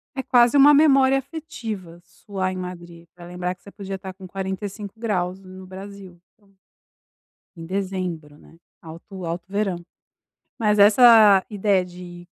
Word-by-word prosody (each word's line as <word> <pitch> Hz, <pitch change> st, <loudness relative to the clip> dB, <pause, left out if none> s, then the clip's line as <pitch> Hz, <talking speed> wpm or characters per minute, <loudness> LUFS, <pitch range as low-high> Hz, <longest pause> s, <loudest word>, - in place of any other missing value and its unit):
É 265 Hz, -, -2 dB
quase 245 Hz, 0 st, +3 dB
uma 290 Hz, +1 st, +7 dB
memória 270 Hz, -3 st, +4 dB
afetiva 225 Hz, -, -7 dB
suar 185 Hz, +1 st, -5 dB
em 185 Hz, -, -6 dB
Madrid, 175 Hz, -2 st, -9 dB
pra 175 Hz, -, -13 dB
lembrar 180 Hz, +1 st, -4 dB
que -, -, -35 dB
você 200 Hz, -, -13 dB
podia 195 Hz, -1 st, -7 dB
estar 190 Hz, 0 st, -8 dB
com 185 Hz, 0 st, -12 dB
45 195 Hz, +2 st, -6 dB
graus 185 Hz, -5 st, -2 dB
no 185 Hz, 0 st, -13 dB
Brasil. 190 Hz, -2 st, -11 dB
Então 200 Hz, -2 st, -30 dB, 1.0 s
em 165 Hz, -, -9 dB
dezembro, 185 Hz, -5 st, -5 dB
né, 165 Hz, -, -20 dB, 0.2 s
alto 170 Hz, +3 st, -10 dB
alto 170 Hz, +1 st, -5 dB
verão. 200 Hz, -2 st, -2 dB, 0.8 s
Mas 210 Hz, -2 st, +1 dB
essa 210 Hz, -2 st, +7 dB
ideia 200 Hz, -3 st, +1 dB
de 175 Hz, -1 st, -12 dB
190 Hz, 145 wpm, -22 LUFS, 180-210 Hz, 1.0 s, uma